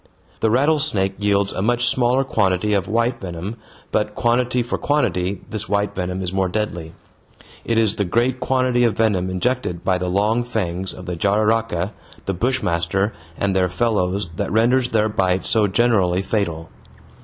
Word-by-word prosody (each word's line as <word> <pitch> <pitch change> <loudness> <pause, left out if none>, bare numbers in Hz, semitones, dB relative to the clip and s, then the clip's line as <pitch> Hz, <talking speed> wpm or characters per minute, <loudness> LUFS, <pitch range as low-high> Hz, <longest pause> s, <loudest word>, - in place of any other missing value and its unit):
The 110 - +2
rattlesnake 135 -6 +2
yields 100 -1 +1
a - - -3
much 120 +3 +2
smaller 125 +2 +2
quantity 105 -5 +1
of 100 -2 0
white 115 +3 0
venom, 95 +4 -6 0.3
but, 105 0 -1
quantity 120 +1 +1
for 120 - -3
quantity, 100 - 0
this 110 0 -4
white 100 0 0
venom 90 0 -3
is 90 0 -4
more 95 -1 +1
deadly. 90 -5 -3 0.7
It 115 - 0
is 110 -2 +3
the 100 - +1
great 120 +7 0
quantity 130 -2 +1
of 115 -3 +1
venom 100 -5 +1
injected 95 -2 -1
by 90 -1 +1
the 90 0 -2
long 105 +6 +1
fangs 95 -6 -3
of 90 - -10
the 90 -1 -4
jararaca, 105 0 +1 0.3
the 95 - -1
bushmaster, 95 -3 0 0.2
and 100 -1 0
their 90 -1 +2
fellows 95 -2 0
that - - -2
renders 120 +3 +3
their 110 -1 +2
bite 95 -3 0
so 110 -2 +2
generally 95 -4 +2
fatal. 85 -6 -2
105 Hz, 165 wpm, -21 LUFS, 90-120 Hz, 0.7 s, is